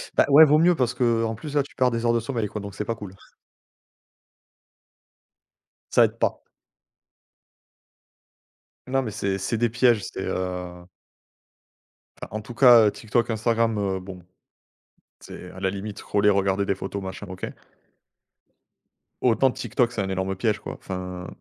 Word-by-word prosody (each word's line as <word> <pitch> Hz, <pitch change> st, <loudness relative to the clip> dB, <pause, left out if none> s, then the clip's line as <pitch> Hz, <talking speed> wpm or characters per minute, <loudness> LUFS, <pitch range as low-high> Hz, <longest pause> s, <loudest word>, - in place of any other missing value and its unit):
Bah -, -, +5 dB
ouais 150 Hz, +3 st, +9 dB
vaut 150 Hz, 0 st, +4 dB
mieux 175 Hz, +3 st, +4 dB
parce 125 Hz, -4 st, 0 dB
qu'en 115 Hz, -3 st, +1 dB
plus 150 Hz, +6 st, -8 dB
là, 145 Hz, -, +3 dB
tu 140 Hz, -, -17 dB
perds 125 Hz, -1 st, +2 dB
des 115 Hz, 0 st, -2 dB
heures 115 Hz, -, +3 dB
de 120 Hz, -, +2 dB
sommeil 115 Hz, -2 st, -3 dB
quoi 105 Hz, +1 st, -6 dB
donc 100 Hz, -1 st, -8 dB
c'est 105 Hz, -, -4 dB
pas 115 Hz, -, -2 dB
cool. 100 Hz, -4 st, -9 dB, 2.8 s
Ça -, -, +6 dB
aide -, -, -5 dB
pas. -, -, -1 dB, 2.5 s
Non, 135 Hz, +1 st, +1 dB
mais 110 Hz, -, -4 dB
c'est 100 Hz, -2 st, -2 dB
c'est 105 Hz, +5 st, -2 dB
des 120 Hz, +1 st, +1 dB
pièges, 120 Hz, -1 st, +3 dB
c'est, -, -, -5 dB
heu 90 Hz, -1 st, -4 dB, 1.3 s
enfin -, -, -5 dB
en -, -, -6 dB
tout 120 Hz, -, -10 dB
cas 120 Hz, -4 st, +7 dB
TikTok, 115 Hz, +2 st, -1 dB
Instagram, 115 Hz, 0 st, +1 dB
heu, 95 Hz, -2 st, -1 dB
bon. 90 Hz, -1 st, -10 dB, 1.0 s
C'est 90 Hz, -, -10 dB
à 90 Hz, -, -12 dB
la 95 Hz, 0 st, 0 dB
limite 100 Hz, +1 st, -6 dB
scroller 105 Hz, 0 st, +2 dB
regarder 100 Hz, 0 st, +1 dB
des 100 Hz, -1 st, -1 dB
photos 100 Hz, +1 st, -5 dB
machin 95 Hz, +2 st, -7 dB
OK. 95 Hz, 0 st, -6 dB, 1.7 s
Autant 125 Hz, +2 st, +3 dB
TikTok, 125 Hz, -1 st, -1 dB
c'est 115 Hz, -, -3 dB
un 95 Hz, -, -3 dB
énorme 95 Hz, 0 st, -2 dB
piège 110 Hz, +2 st, 0 dB
quoi -, -, -7 dB
enfin 90 Hz, -1 st, -6 dB
105 Hz, 155 wpm, -24 LUFS, 95-120 Hz, 2.8 s, ouais